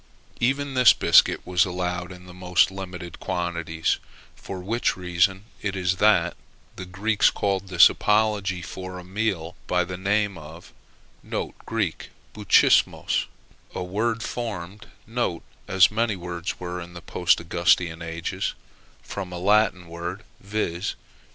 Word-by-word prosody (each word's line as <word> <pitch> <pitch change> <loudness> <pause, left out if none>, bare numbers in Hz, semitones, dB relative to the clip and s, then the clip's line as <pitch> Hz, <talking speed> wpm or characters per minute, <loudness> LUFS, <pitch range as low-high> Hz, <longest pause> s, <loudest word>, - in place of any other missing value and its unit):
Even 135 +3 0
this 125 -2 +7
biscuit - - +4
was 90 -1 +3
allowed 90 0 -3
in 90 0 -12
the 90 - -12
most 90 +1 +2
limited 90 -3 -7
quantities; 85 -3 -1 0.4
for 95 - -7
which 110 +5 -1
reason 90 +2 +1 0.2
it 100 -2 -2
is 95 0 0
that 105 -5 +3 0.4
the 95 - -7
Greeks 100 +3 +2
called 95 -1 -1
this 90 -2 +8
apology 105 -4 +1
for 95 0 -7
a - - -7
a - - -13
meal 95 -3 -2
by 90 0 +2
the 90 +1 -6
name 100 -1 0
of 80 +3 -12 0.9
[Greek: 105 -7 -2 0.2
bouchismos], 105 -2 +3 0.5
a - - -2
word 110 +5 -1
formed 105 -3 -5 0.8
(as 95 +1 +5
many 110 -1 0
words 85 -1 -5
were 90 0 -5
in 85 0 -10
the 85 - -8
Post 90 0 +2
Augustan 85 0 +1
ages) 85 0 -3 0.5
from 95 -3 -6
a 90 - -5
Latin 95 -1 +2
word 85 +4 -6 0.2
viz. 100 -3 -3
90 Hz, 135 wpm, -24 LUFS, 90-105 Hz, 0.9 s, this